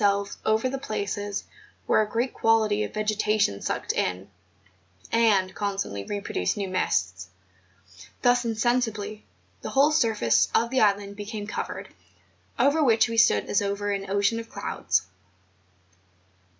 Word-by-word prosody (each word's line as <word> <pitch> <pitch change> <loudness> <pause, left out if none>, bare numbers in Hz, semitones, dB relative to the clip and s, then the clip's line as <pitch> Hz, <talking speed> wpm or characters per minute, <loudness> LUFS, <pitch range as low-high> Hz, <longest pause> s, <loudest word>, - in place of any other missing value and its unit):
269 200 0 +3
selves 200 - -11
over 220 +3 +2
the 265 +1 -3
places 205 -1 -3 0.4
where - - +3
a 210 - -2
great 235 +4 -1
quantity 220 -2 +2
of - - -5
ve¬ 215 0 -3
getation 210 - +1
sucked - - -2
in 90 +1 -2 0.8
and 205 -5 +3
constantly 195 - -3
reproduced 200 - -2
new 200 -1 -2
mists. 95 - -1 0.9
Thus 245 0 +4
insensibly 225 -2 -1 0.4
the - - -5
whole 280 +3 +4
surface 225 - +2
of 235 +1 +2
the 260 - +2
island 200 -1 +1
became 210 0 -5
covered, 210 - -5 0.7
over 300 +3 +3
which 230 -3 +4
we 230 - -3
stood 105 - +4
as 205 - +1
over 200 0 -2
an 195 -1 -3
ocean 200 +3 +1
of 230 - -8
clouds. - - -1
210 Hz, 140 wpm, -26 LUFS, 200-230 Hz, 0.9 s, Thus